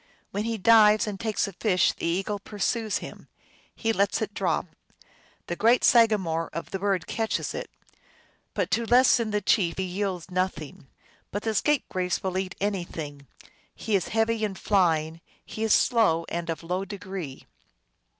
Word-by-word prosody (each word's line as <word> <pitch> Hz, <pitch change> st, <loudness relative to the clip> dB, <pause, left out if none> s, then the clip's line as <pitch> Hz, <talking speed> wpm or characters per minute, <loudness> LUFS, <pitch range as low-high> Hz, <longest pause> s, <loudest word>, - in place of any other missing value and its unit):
When 205 Hz, +2 st, -2 dB
he 230 Hz, -1 st, -2 dB
dives 215 Hz, 0 st, +6 dB
and 205 Hz, -3 st, -5 dB
takes 220 Hz, -3 st, -1 dB
a 200 Hz, -, -8 dB
fish 185 Hz, -1 st, +2 dB
the -, -, -4 dB
eagle 195 Hz, +4 st, -1 dB
pursues 215 Hz, +2 st, -2 dB
him; -, -, -11 dB, 0.5 s
he 225 Hz, 0 st, 0 dB
lets 200 Hz, -1 st, +1 dB
it 210 Hz, -2 st, -3 dB
drop; -, -, 0 dB, 0.8 s
the 175 Hz, -, -3 dB
great 230 Hz, +6 st, +3 dB
sagamore 200 Hz, -9 st, +3 dB
of 165 Hz, -, -6 dB
the 195 Hz, -, -3 dB
birds 195 Hz, -3 st, 0 dB
catches 225 Hz, -1 st, -2 dB
it; -, -, -5 dB, 0.9 s
but -, -, -1 dB
to 230 Hz, 0 st, +1 dB
less 250 Hz, +2 st, +6 dB
than 230 Hz, -2 st, -2 dB
the 210 Hz, 0 st, 0 dB
chief 180 Hz, -3 st, +2 dB
he 190 Hz, -, -1 dB
yields 185 Hz, -2 st, -3 dB
nothing. 180 Hz, -7 st, -3 dB, 0.4 s
But 205 Hz, -, -4 dB
the 220 Hz, -, -1 dB
Scapegrace 195 Hz, -8 st, 0 dB
will 190 Hz, -1 st, -1 dB
eat 190 Hz, -1 st, -4 dB
any 200 Hz, -2 st, -1 dB
thing; 145 Hz, -4 st, -8 dB, 0.5 s
he 220 Hz, -, -1 dB
is 185 Hz, -, 0 dB
heavy 225 Hz, 0 st, 0 dB
in 205 Hz, -2 st, -1 dB
flying; 165 Hz, -5 st, +1 dB, 0.2 s
he 220 Hz, -, -5 dB
is 220 Hz, -, +1 dB
slow 170 Hz, -11 st, +3 dB
and 170 Hz, 0 st, -4 dB
of 165 Hz, 0 st, -4 dB
low 180 Hz, +3 st, -2 dB
degree. 190 Hz, -7 st, -7 dB
195 Hz, 170 wpm, -26 LUFS, 175-220 Hz, 0.9 s, dives